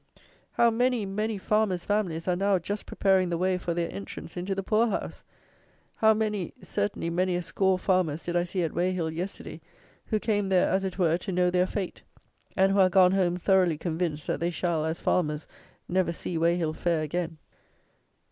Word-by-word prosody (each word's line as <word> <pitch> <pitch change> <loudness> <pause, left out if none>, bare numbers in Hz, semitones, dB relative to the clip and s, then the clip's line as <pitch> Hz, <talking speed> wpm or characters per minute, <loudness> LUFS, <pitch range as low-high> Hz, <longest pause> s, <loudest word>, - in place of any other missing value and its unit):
How 235 0 +4
many, 245 -1 +1
many 210 +2 -2
farmers' 195 -3 0
families 190 -6 -1
are 180 - +2
now 195 +1 +2
just 200 +4 -5
preparing 190 -2 +2
the 170 - -1
way 185 +1 +1
for 170 -1 -3
their 170 -1 -2
entrance 100 +11 -8
into 185 +2 -3
the 195 - -3
poor 220 +4 +2
house! 220 - -4 0.7
How 220 0 +5
many; 210 -4 -2
certainly 205 -7 -2
many 180 +1 +1
a 175 - -2
score 190 +2 +1
farmers 180 -5 0
did 175 - -3
I 175 - +3
see 180 +1 -2
at 160 - -2
Weyhill, 175 -2 0
yesterday, 180 +5 -6 0.5
who 215 - 0
came 205 -3 0
there 185 -1 +3
as 190 +1 +1
it 190 -1 -4
were 170 -2 +2
to 195 - -5
know 180 0 +2
their 180 0 +2
fate; 190 -2 -4 0.6
and 190 0 +4
who 200 - +2
are 185 -1 +6
gone 185 0 +5
home 180 -2 +1
thoroughly 185 -3 +3
convinced, 160 -2 -2
that - - -2
they 170 - 0
shall, 170 -2 -1
as 160 +1 -2
farmers, 150 -4 0 0.4
never 185 -1 +1
see 170 +1 -5
Weyhill 165 -1 +1
fair 170 -3 0
again! 165 +1 -3
180 Hz, 190 wpm, -27 LUFS, 170-195 Hz, 0.7 s, are